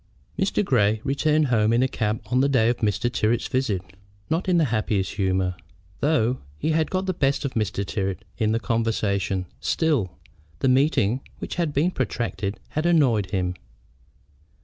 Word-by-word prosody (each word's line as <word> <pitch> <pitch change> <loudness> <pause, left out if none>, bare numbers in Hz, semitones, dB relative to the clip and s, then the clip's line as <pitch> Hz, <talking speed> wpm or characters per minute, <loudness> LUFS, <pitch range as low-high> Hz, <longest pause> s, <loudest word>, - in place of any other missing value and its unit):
Mr. 200 +1 0
Grey 110 - +2
returned 150 +1 +2
home 110 -2 +3
in 120 +2 +3
a - - +3
cab 110 -3 -2
on 125 +1 +3
the 140 - +3
day 120 -4 +3
of 120 - 0
Mr. 110 +2 0
Tyrrwhit's 120 0 0
visit, 125 -9 -1 0.5
not 170 +4 0
in 180 - +4
the 165 - +4
happiest 105 -4 0
humor. 95 -2 0 0.4
Though 130 -5 +2 0.2
he 155 - -1
had 160 0 +1
got 185 0 -1
the 185 - 0
best 140 -4 0
of 135 - -3
Mr. 105 -3 -1
Tyrrwhit 95 -1 -3 0.2
in 110 -2 +2
the 115 - +1
conversation, 105 -5 0
still, 105 - 0 0.4
the 80 - 0
meeting, 130 -3 +2 0.2
which - - -6
had 165 -3 0
been 150 +6 +1
protracted, 105 - -2
had 155 +3 -1
annoyed 125 - +3
him. 90 -1 -1
115 Hz, 170 wpm, -24 LUFS, 100-145 Hz, 0.5 s, in